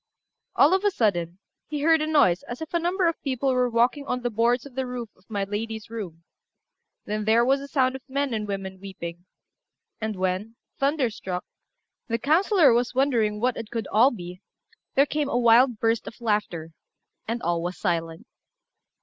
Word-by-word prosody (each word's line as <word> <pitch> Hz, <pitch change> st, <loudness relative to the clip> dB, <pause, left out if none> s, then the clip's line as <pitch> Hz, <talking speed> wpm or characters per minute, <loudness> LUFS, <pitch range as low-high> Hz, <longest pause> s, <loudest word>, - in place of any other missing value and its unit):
All 300 Hz, +6 st, +5 dB
of 380 Hz, +1 st, +2 dB
a 410 Hz, -, +4 dB
sudden, 175 Hz, -, 0 dB, 0.3 s
he 295 Hz, -1 st, -4 dB
heard 320 Hz, 0 st, +4 dB
a 310 Hz, -, -1 dB
noise 285 Hz, -, +4 dB
as 240 Hz, -, -6 dB
if 320 Hz, +1 st, -7 dB
a 340 Hz, -, +2 dB
number 355 Hz, +2 st, +1 dB
of 335 Hz, -, -2 dB
people 265 Hz, -1 st, 0 dB
were 250 Hz, -1 st, +2 dB
walking 240 Hz, +5 st, +2 dB
on 250 Hz, 0 st, -2 dB
the 245 Hz, -, -1 dB
boards 235 Hz, +3 st, +1 dB
of 280 Hz, -, -11 dB
the 260 Hz, 0 st, -2 dB
roof 245 Hz, -2 st, -5 dB
of 185 Hz, -, -30 dB
my 205 Hz, -2 st, -1 dB
lady's 220 Hz, +2 st, -5 dB
room; 180 Hz, -8 st, -7 dB, 0.8 s
then 210 Hz, 0 st, -3 dB
there 230 Hz, +2 st, +4 dB
was 270 Hz, +2 st, +2 dB
a 280 Hz, -, -7 dB
sound 260 Hz, -2 st, +1 dB
of 265 Hz, -, -7 dB
men 275 Hz, -1 st, -1 dB
and 215 Hz, -1 st, -2 dB
women 190 Hz, -1 st, -5 dB
weeping; 175 Hz, -3 st, -8 dB, 0.8 s
and 215 Hz, -1 st, -2 dB
when, 185 Hz, +4 st, -2 dB, 0.2 s
thunderstruck, 240 Hz, -, -1 dB, 0.6 s
the 230 Hz, -2 st, 0 dB
councillor 320 Hz, -, +4 dB
was 245 Hz, +1 st, 0 dB
wondering 235 Hz, -6 st, +2 dB
what 250 Hz, +2 st, 0 dB
it 225 Hz, -1 st, -6 dB
could 230 Hz, -3 st, -3 dB
all 230 Hz, +6 st, +6 dB
be, 180 Hz, -6 st, -8 dB, 0.5 s
there 275 Hz, -, +5 dB
came 295 Hz, -1 st, -1 dB
a -, -, 0 dB
wild 240 Hz, 0 st, +5 dB
burst 225 Hz, +1 st, 0 dB
of 230 Hz, -, -9 dB
laughter, 210 Hz, -8 st, -1 dB, 0.6 s
and 230 Hz, +1 st, -3 dB
all 170 Hz, 0 st, 0 dB
was 175 Hz, 0 st, -4 dB
silent. 165 Hz, -3 st, -2 dB
230 Hz, 185 wpm, -25 LUFS, 200-270 Hz, 0.8 s, all